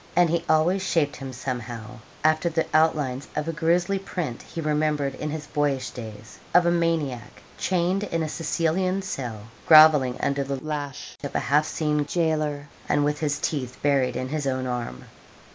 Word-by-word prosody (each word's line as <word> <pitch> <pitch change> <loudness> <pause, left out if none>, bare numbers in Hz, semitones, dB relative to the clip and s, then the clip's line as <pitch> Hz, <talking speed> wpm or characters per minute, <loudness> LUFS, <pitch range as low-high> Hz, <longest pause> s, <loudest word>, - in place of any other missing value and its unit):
And 175 -2 +4
he 170 0 0
always 170 +5 +3
shaped 165 -6 0
him 135 -1 -6
somehow 120 -2 -6 0.2
after 155 +2 +3
the 165 0 0
outlines 145 -5 +2
of 150 +1 -2
a 165 - -1
grizzly 175 +4 +1
print 175 -10 -4
he - - -8
remembered 150 -2 0
in 150 - -4
his 150 0 -5
boyish 140 -5 -1
days, 110 -3 -10 0.2
of 180 -1 +6
a 170 - +4
maniac 160 -8 -1 0.2
chained 185 +2 +1
in 165 -4 -1
a - - -2
Sicilian 180 +4 0
cell, 120 - -5 0.3
grovelling 155 -5 +7
under 140 0 0
the 135 0 -3
lash 145 -3 -5
of 140 - -5
a - - +3
half 150 +4 +2
seen 150 -2 0
gaoler, 155 -4 0 0.2
and 145 0 +3
with 150 0 0
his 145 -2 0
teeth 130 -5 -3
buried 140 -3 +2
in 130 +1 -3
his 150 -1 -2
own 130 -1 -1
arm. 120 - -4
150 Hz, 175 wpm, -25 LUFS, 130-165 Hz, 0.3 s, grovelling